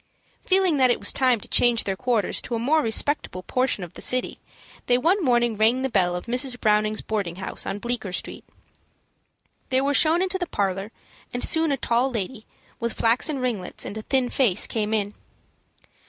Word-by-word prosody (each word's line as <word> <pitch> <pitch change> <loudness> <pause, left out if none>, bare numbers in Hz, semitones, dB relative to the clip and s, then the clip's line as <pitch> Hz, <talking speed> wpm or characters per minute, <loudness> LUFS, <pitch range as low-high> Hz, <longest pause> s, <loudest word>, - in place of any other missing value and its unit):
Feeling 375 -4 +3
that 260 -2 +4
it 245 - +1
was - - +1
time 255 -3 +2
to - - -12
change 240 -2 +3
their 195 - -2
quarters 235 -2 -1
to 240 - -4
a - - -1
more 290 +7 +2
respectable 225 -5 -1
portion 255 -2 -1
of 175 - -9
the - - -10
city, 255 0 0 0.5
they 245 - +4
one 345 +9 +2
morning 240 -4 +2
rang 225 +5 +2
the 265 - -1
bell 180 -4 +2
of 180 - -5
Mrs. 250 +1 -2
Browning's 215 0 +1
boarding 200 -6 -3
house, 190 - -4
on 195 - -3
Bleecker 235 -3 -3
Street. 180 - -6 1.3
They 260 - +3
were 280 +2 +1
shown 325 +5 +4
into 380 0 -1
the 355 - -2
parlor, 195 - -2 0.4
and 245 - -2
soon 320 -1 +2
a 275 - 0
tall 240 +2 +1
lady, 225 -1 -5 0.3
with 235 -1 -2
flaxen 245 +6 +2
ringlets 235 -8 -3
and - - -6
a 220 - -5
thin 255 +2 0
face, 240 -10 +2
came 215 -2 -2
in. 205 -2 -1
240 Hz, 190 wpm, -24 LUFS, 210-265 Hz, 1.3 s, that